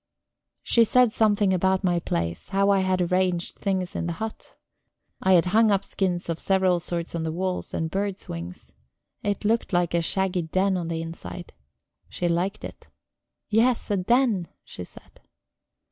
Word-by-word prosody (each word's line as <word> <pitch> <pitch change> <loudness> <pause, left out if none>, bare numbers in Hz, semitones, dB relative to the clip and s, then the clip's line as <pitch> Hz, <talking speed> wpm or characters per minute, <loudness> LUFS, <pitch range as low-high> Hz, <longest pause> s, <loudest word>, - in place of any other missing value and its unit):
She 235 - +4
said 245 0 +4
something 205 -3 +3
about 190 +2 +1
my 175 -2 +2
place; 85 - -3
how 200 +1 +2
I 195 - +4
had 185 -1 +1
arranged 180 0 0
things 190 -3 -2
in 170 - -2
the 170 - -2
hut. 220 +5 -7 0.7
I 190 - +4
had 175 -1 +5
hung 220 0 +5
up 195 -1 +1
skins 180 -3 -1
of 165 -1 -3
several 190 -2 +2
sorts 170 0 -4
on 170 - -2
the 160 0 -2
walls, 185 +2 -3
and 160 0 -3
birds' 200 0 -3
wings; 85 +1 -8 0.5
it 205 +1 -2
looked 225 -1 +1
like 175 -1 +1
a 170 - +2
shaggy 190 +1 0
den 185 +4 +1
on 175 -2 -2
the 165 -1 -3
inside. 165 +1 -8 0.6
She 175 - -2
liked 180 +4 -1
it. - - -11 0.6
"Yes, 230 +1 +2
a 205 - +2
den," 215 -2 +2 0.2
she 90 - -8
said. - - -18
185 Hz, 170 wpm, -25 LUFS, 170-200 Hz, 0.7 s, had